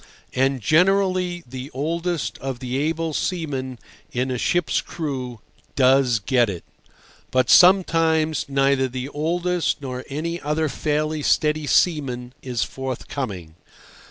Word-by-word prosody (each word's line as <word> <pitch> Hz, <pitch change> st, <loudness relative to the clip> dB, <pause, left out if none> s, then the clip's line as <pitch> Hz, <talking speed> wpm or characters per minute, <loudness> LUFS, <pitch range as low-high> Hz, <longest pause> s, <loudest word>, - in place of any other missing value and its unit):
And 135 Hz, 0 st, +1 dB
generally 180 Hz, -, +2 dB
the 130 Hz, +2 st, -7 dB
oldest 165 Hz, +3 st, -2 dB
of 135 Hz, -2 st, -4 dB
the 125 Hz, +1 st, -5 dB
able 160 Hz, +2 st, -1 dB
seamen 140 Hz, -8 st, -3 dB, 0.3 s
in 125 Hz, +1 st, -1 dB
a 125 Hz, -, -1 dB
ship's 175 Hz, -3 st, +1 dB
crew 130 Hz, -8 st, -5 dB, 0.3 s
does 130 Hz, -2 st, +4 dB
get 120 Hz, +2 st, +2 dB
it. 90 Hz, -4 st, -6 dB, 0.7 s
But 130 Hz, -2 st, +2 dB
sometimes 165 Hz, -4 st, +4 dB
neither 135 Hz, -1 st, +2 dB
the 130 Hz, +1 st, -5 dB
oldest 170 Hz, +3 st, -1 dB
nor 130 Hz, -2 st, -5 dB
any 170 Hz, +4 st, -3 dB
other 150 Hz, +1 st, 0 dB
fairly 155 Hz, +1 st, -1 dB
steady 150 Hz, 0 st, +1 dB
seaman 130 Hz, -7 st, +1 dB
is 125 Hz, -4 st, -2 dB
forthcoming. 120 Hz, -, -5 dB
140 Hz, 120 wpm, -22 LUFS, 130-165 Hz, 0.7 s, does